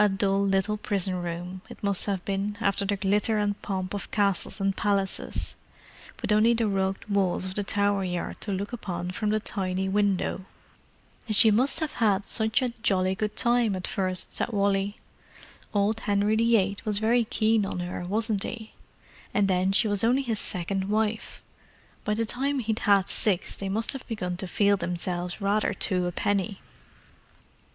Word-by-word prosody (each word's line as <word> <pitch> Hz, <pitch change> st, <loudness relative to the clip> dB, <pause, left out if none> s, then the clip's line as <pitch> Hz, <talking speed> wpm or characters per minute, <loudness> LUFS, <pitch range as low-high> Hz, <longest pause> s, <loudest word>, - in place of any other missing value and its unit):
A 210 Hz, -, +4 dB
dull 195 Hz, 0 st, +1 dB
little 200 Hz, +2 st, +1 dB
prison 190 Hz, -3 st, 0 dB
room, 175 Hz, +2 st, -5 dB
it -, -, -12 dB
must 200 Hz, -1 st, +2 dB
have 195 Hz, -3 st, -2 dB
been, 200 Hz, +1 st, -2 dB
after 200 Hz, -2 st, +1 dB
the 200 Hz, +1 st, 0 dB
glitter 205 Hz, +3 st, +1 dB
and 205 Hz, -1 st, -1 dB
pomp 185 Hz, -1 st, -3 dB
of 200 Hz, -, -5 dB
castles 200 Hz, -1 st, 0 dB
and 195 Hz, 0 st, 0 dB
palaces—with 200 Hz, +1 st, -3 dB
only 220 Hz, +3 st, +4 dB
the 230 Hz, -1 st, +1 dB
rugged 195 Hz, 0 st, -1 dB
walls 195 Hz, -3 st, +1 dB
of 185 Hz, -, -4 dB
the 205 Hz, -, -2 dB
Tower 200 Hz, 0 st, +1 dB
Yard 180 Hz, -2 st, -4 dB
to 205 Hz, -, -3 dB
look 200 Hz, +4 st, -3 dB
upon 180 Hz, -6 st, -4 dB
from 210 Hz, +3 st, -2 dB
the 215 Hz, +1 st, +2 dB
tiny 190 Hz, -2 st, -2 dB
window. 195 Hz, -1 st, 0 dB, 0.8 s
"And 215 Hz, -, 0 dB
she 220 Hz, +2 st, +6 dB
must 255 Hz, +9 st, +2 dB
have 315 Hz, -, -1 dB
had 205 Hz, -2 st, +3 dB
such 220 Hz, +4 st, +1 dB
a 250 Hz, -, +1 dB
jolly 190 Hz, -4 st, +2 dB
good 210 Hz, +2 st, -3 dB
time 235 Hz, -4 st, +2 dB
at 185 Hz, -, -4 dB
first," 185 Hz, -2 st, 0 dB
said -, -, +1 dB
Wally. 200 Hz, -1 st, 0 dB, 0.7 s
"Old 210 Hz, +1 st, +1 dB
Henry 205 Hz, -1 st, +1 dB
VIII 220 Hz, -3 st, +2 dB
was 210 Hz, -2 st, -1 dB
very 230 Hz, +3 st, +3 dB
keen 220 Hz, -1 st, +2 dB
on 195 Hz, -, -3 dB
her, 175 Hz, 0 st, -4 dB
wasn't 210 Hz, +2 st, 0 dB
he? 220 Hz, 0 st, -5 dB, 0.6 s
And 205 Hz, -1 st, +3 dB
then 185 Hz, 0 st, +2 dB
she 210 Hz, +3 st, +3 dB
was 205 Hz, -1 st, +1 dB
only 250 Hz, +4 st, +3 dB
his 225 Hz, -5 st, -1 dB
second 190 Hz, +1 st, -1 dB
wife—by 215 Hz, 0 st, -4 dB
the 230 Hz, +1 st, 0 dB
time 275 Hz, +5 st, 0 dB
he'd 225 Hz, -3 st, -1 dB
had 200 Hz, -1 st, +5 dB
six 195 Hz, -4 st, +2 dB
they 195 Hz, -, -5 dB
must 220 Hz, +6 st, 0 dB
have 270 Hz, -, -8 dB
begun 180 Hz, -6 st, -3 dB
to 190 Hz, -, -5 dB
feel 200 Hz, +2 st, +2 dB
themselves 180 Hz, +1 st, -3 dB
rather 205 Hz, 0 st, +1 dB
two 180 Hz, -2 st, +1 dB
a -, -, -2 dB
penny!" 200 Hz, +2 st, -1 dB
200 Hz, 175 wpm, -27 LUFS, 190-215 Hz, 0.8 s, she